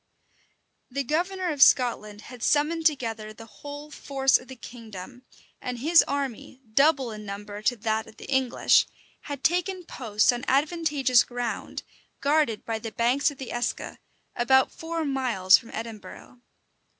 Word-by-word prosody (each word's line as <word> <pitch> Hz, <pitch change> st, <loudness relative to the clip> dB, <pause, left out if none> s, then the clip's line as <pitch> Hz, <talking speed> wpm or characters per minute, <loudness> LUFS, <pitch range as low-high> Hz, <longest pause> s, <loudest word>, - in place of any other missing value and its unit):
The 275 Hz, +2 st, -2 dB
governor 360 Hz, +6 st, -1 dB
of 290 Hz, -3 st, -4 dB
Scotland 215 Hz, -6 st, +4 dB
had 245 Hz, +1 st, -12 dB
summoned 315 Hz, +5 st, +2 dB
together 225 Hz, -7 st, -3 dB
the 225 Hz, +2 st, -12 dB
whole 290 Hz, +5 st, -10 dB
force 270 Hz, -2 st, +2 dB
of -, -, -15 dB
the 260 Hz, -, -9 dB
kingdom; 230 Hz, -1 st, -11 dB, 0.4 s
and 250 Hz, -1 st, -4 dB
his 320 Hz, +7 st, +5 dB
army, 270 Hz, -2 st, -4 dB
double 275 Hz, -2 st, +3 dB
in 215 Hz, 0 st, -8 dB
number 205 Hz, 0 st, -7 dB
to 245 Hz, +3 st, +1 dB
that 220 Hz, 0 st, -2 dB
of 220 Hz, -, -16 dB
the -, -, -10 dB
English, 265 Hz, -2 st, +3 dB, 0.4 s
had 285 Hz, -2 st, -6 dB
taken 360 Hz, +2 st, 0 dB
post 225 Hz, -4 st, +1 dB
on 245 Hz, 0 st, -5 dB
advantageous 285 Hz, -3 st, +3 dB
ground, 245 Hz, -1 st, -5 dB, 0.4 s
guarded 285 Hz, -6 st, +1 dB
by 225 Hz, -1 st, -2 dB
the 225 Hz, 0 st, -6 dB
banks 245 Hz, +7 st, +2 dB
of 285 Hz, -, -11 dB
the 265 Hz, -2 st, -7 dB
Eske, 240 Hz, 0 st, -3 dB, 0.4 s
about 260 Hz, +2 st, +3 dB
four 325 Hz, 0 st, -4 dB
miles 250 Hz, -9 st, +3 dB
from 235 Hz, -, -15 dB
Edinburgh. 225 Hz, +2 st, -9 dB
255 Hz, 150 wpm, -26 LUFS, 225-290 Hz, 0.4 s, his